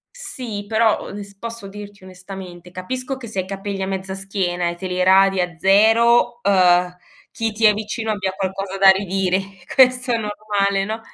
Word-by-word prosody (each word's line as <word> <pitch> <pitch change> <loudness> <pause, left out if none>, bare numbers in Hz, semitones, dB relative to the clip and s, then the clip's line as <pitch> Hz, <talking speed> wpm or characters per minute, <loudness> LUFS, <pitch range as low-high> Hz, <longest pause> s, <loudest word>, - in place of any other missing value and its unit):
Sì 230 - -7
però, 220 0 +2
ones 200 0 -9
posso 230 -2 -7
dirti 205 0 -11
onestamente, 185 -1 -11
capisco 255 +8 -5
che 240 -4 -9
se 205 - -7
hai 185 - 0
i - - -15
capelli 195 0 -5
a - - -1
mezza 190 0 -4
schiena 180 -3 -2
e 170 - -3
te 185 +2 -6
li 180 0 -3
radi 195 0 +4
a 180 -2 -3
zero, 230 +5 +4
uhm, 180 -2 +3 0.3
chi 225 -1 -3
ti 220 +2 -2
è 210 - +8
vicino 220 +1 -4
abbia 195 -3 -2
qualcosa 190 0 -4
da 195 0 +5
ridire, 190 -1 0 0.3
questo 255 -1 +4
è 235 - +3
normale, 205 -2 -1
no, 220 +2 -4
195 Hz, 185 wpm, -20 LUFS, 190-220 Hz, 0.3 s, è